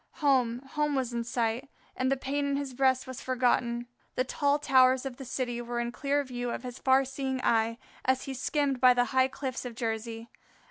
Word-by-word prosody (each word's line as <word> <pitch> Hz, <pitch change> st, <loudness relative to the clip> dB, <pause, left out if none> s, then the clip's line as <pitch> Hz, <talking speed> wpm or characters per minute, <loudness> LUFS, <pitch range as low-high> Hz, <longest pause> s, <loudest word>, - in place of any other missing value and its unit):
Home, 255 Hz, -6 st, +2 dB
home 295 Hz, +1 st, -1 dB
was 255 Hz, -3 st, -1 dB
in 235 Hz, 0 st, -1 dB
sight, 235 Hz, +2 st, -1 dB, 0.3 s
and 260 Hz, +1 st, 0 dB
the 275 Hz, -, +2 dB
pain 275 Hz, +2 st, -2 dB
in 280 Hz, -, 0 dB
his 280 Hz, -2 st, -3 dB
breast 260 Hz, 0 st, +2 dB
was 260 Hz, -1 st, -7 dB
forgotten. 245 Hz, -2 st, +1 dB, 0.3 s
The 255 Hz, -, +2 dB
tall 285 Hz, +2 st, +1 dB
towers 260 Hz, -2 st, +4 dB
of 260 Hz, -2 st, -5 dB
the 270 Hz, -, -8 dB
city 245 Hz, -1 st, -2 dB
were 240 Hz, 0 st, -3 dB
in 240 Hz, 0 st, -2 dB
clear 285 Hz, +3 st, 0 dB
view 245 Hz, -2 st, -4 dB
of -, -, -4 dB
his 250 Hz, 0 st, -7 dB
far 265 Hz, 0 st, +4 dB
seeing 265 Hz, 0 st, -3 dB
eye 225 Hz, 0 st, +2 dB, 0.3 s
as 260 Hz, 0 st, +1 dB
he 270 Hz, -, -5 dB
skimmed 270 Hz, 0 st, 0 dB
by 250 Hz, -1 st, +7 dB
the 245 Hz, 0 st, +3 dB
high 260 Hz, 0 st, +5 dB
cliffs 265 Hz, -1 st, -5 dB
of 245 Hz, -2 st, -6 dB
Jersey. 225 Hz, 0 st, -4 dB
255 Hz, 205 wpm, -29 LUFS, 240-270 Hz, 0.3 s, by